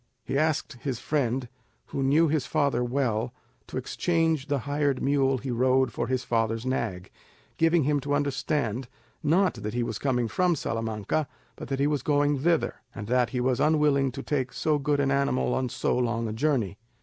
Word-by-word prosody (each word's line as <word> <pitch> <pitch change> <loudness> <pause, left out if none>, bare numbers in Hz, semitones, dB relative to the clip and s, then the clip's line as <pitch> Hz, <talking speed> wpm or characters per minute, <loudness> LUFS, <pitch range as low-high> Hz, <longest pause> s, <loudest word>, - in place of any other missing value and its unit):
He 135 - -3
asked 155 -2 0
his 135 -4 -2
friend, 125 -1 -1 0.4
who 140 - -3
knew 145 +5 +4
his 145 -4 0
father 140 -5 +1
well, 120 -2 -1 0.3
to - - -6
exchange 165 -4 0
the 145 -1 +1
hired 145 0 0
mule 135 -1 +2
he 130 +1 -4
rode 130 +2 +2
for 120 - -2
his 130 0 -1
father's 115 -1 0
nag, 115 -8 -2 0.5
giving 165 0 +3
him 145 +1 +2
to 145 +1 -1
understand, 140 -4 -1 0.3
not 180 +4 +3
that 105 +2 -5
he 120 - +1
was 110 -3 -4
coming 125 -4 +1
from 175 - +2
Salamanca, 115 +3 -2 0.3
but - - -8
that 135 0 -2
he 140 - +3
was 145 -2 +1
going 145 0 +2
thither, 165 +3 +1 0.2
and 105 - -5
that 125 +1 +2
he 125 - -2
was 125 0 +1
unwilling 150 -3 +3
to 135 - -6
take 130 -4 -1
so 150 +5 +1
good 145 0 +1
an 140 -1 +2
animal 140 -1 +1
on 130 -1 0
so - - 0
long 115 -2 0
a 110 - -3
journey. 115 -6 0
135 Hz, 185 wpm, -27 LUFS, 120-145 Hz, 0.5 s, knew